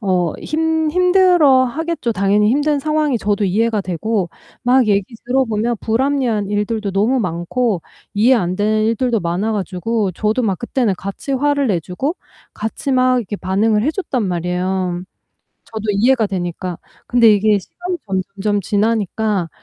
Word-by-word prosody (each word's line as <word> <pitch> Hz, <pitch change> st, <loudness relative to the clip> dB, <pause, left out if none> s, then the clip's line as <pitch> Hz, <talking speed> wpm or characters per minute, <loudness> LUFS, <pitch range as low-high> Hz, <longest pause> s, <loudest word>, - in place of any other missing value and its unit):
어 180 Hz, -6 st, +1 dB
힘 320 Hz, 0 st, 0 dB
힘들어하겠죠. 330 Hz, -6 st, +3 dB
당연히 205 Hz, +1 st, +2 dB
힘든 290 Hz, +3 st, +1 dB
상황이 305 Hz, -4 st, 0 dB
저도 205 Hz, 0 st, 0 dB
이해가 215 Hz, +3 st, +1 dB
되고 190 Hz, +1 st, -2 dB, 0.3 s
막 250 Hz, 0 st, +4 dB
얘기 200 Hz, +3 st, 0 dB
들어보면 240 Hz, -3 st, 0 dB
불합리한 235 Hz, -3 st, 0 dB
일들도 210 Hz, 0 st, -1 dB
너무 215 Hz, +7 st, +1 dB
많고 180 Hz, +3 st, -1 dB, 0.3 s
이해 230 Hz, +6 st, +4 dB
안 185 Hz, -6 st, 0 dB
되는 215 Hz, +2 st, +1 dB
일들도 230 Hz, +1 st, +1 dB
많아가지고 195 Hz, +3 st, -1 dB
저도 215 Hz, +7 st, 0 dB
막 195 Hz, -6 st, 0 dB
그때는 240 Hz, -4 st, 0 dB
같이 200 Hz, +9 st, -5 dB
화를 285 Hz, +1 st, +1 dB
내주고 190 Hz, -, -2 dB, 0.4 s
같이 220 Hz, +5 st, -4 dB
막 255 Hz, 0 st, +3 dB
이렇게 210 Hz, -3 st, -4 dB
반응을 210 Hz, +3 st, +1 dB
해줬단 300 Hz, -, -1 dB
말이에요 180 Hz, 0 st, -2 dB, 0.6 s
저도 220 Hz, -2 st, -7 dB
이해가 225 Hz, +2 st, +3 dB
되니까. 180 Hz, -2 st, -4 dB, 0.3 s
근데 235 Hz, -3 st, +5 dB
이게 210 Hz, +1 st, +3 dB
시간이 355 Hz, -, -5 dB
점점점 200 Hz, +1 st, -2 dB
지나니까 210 Hz, -2 st, 0 dB
215 Hz, 320 characters per minute, -18 LUFS, 195-255 Hz, 0.6 s, 근데